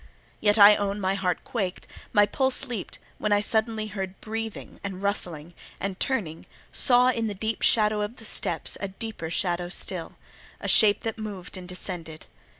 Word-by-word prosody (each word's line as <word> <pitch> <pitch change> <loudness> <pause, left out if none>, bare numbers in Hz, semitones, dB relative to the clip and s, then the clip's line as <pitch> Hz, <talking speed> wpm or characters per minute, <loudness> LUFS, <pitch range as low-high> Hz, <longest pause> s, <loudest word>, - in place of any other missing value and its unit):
Yet 205 0 +3
I 205 0 +9
own 200 0 -2
my 190 -1 0
heart 185 -3 -1
quaked, 195 -6 -3 0.3
my 205 0 +5
pulse 260 +5 +1
leaped, 230 -6 -5 0.2
when 210 - -1
I 205 - +5
suddenly 220 +1 +1
heard 195 -2 -6
breathing 225 0 -6
and 195 -2 -5
rustling, 175 -5 -1 0.3
and 195 -1 -4
turning, 190 - -1 0.2
saw 250 -1 +5
in 230 -3 0
the 205 - -4
deep 220 +3 -3
shadow 210 -1 +3
of 210 +3 -3
the 225 - -9
steps 170 -6 0
a 200 - -1
deeper 195 -4 -6
shadow 175 0 -1
still—a 180 -2 -5
shape 205 -2 +6
that 225 -1 -4
moved 205 -4 -7
and 185 -1 -8
descended. 170 -3 -3
205 Hz, 165 wpm, -26 LUFS, 185-220 Hz, 0.3 s, I